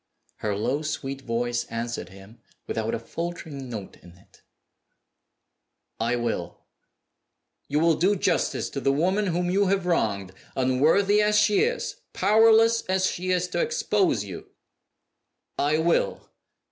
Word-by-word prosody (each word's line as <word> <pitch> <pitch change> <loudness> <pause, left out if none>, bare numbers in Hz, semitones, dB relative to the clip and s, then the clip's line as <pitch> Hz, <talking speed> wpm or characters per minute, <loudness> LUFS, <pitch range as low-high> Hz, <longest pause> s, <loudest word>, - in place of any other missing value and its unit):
Her 105 -2 -2
low, 130 +8 -1
sweet 135 -3 -4
voice 120 -1 -2
answered 115 0 -5
him, 100 +4 -15 0.3
without 110 0 -2
a - - -1
faltering 155 -1 -6
note 105 -5 -7
in 85 0 -16
it, 95 - -24 1.6
"I 115 +2 +1
will!" 115 -8 -3 1.1
"You 150 +2 0
will 165 0 +4
do 190 +6 +2
justice 185 - 0
to 140 - -3
the 135 - +2
woman 185 +8 +1
whom 175 0 0
you 200 +1 +2
have 195 -1 +1
wronged 100 - 0 0.2
unworthy 155 +11 +3
as 210 0 +3
she 210 0 +4
is; 480 0 -1 0.2
powerless 225 +2 +5
as 185 0 +2
she 185 +1 -4
is 180 -1 +1
to - - -1
expose 210 - +1
you?" 95 -4 -9 1.1
"I 150 +2 +2
will!" 165 +1 0
155 Hz, 135 wpm, -25 LUFS, 115-195 Hz, 1.6 s, powerless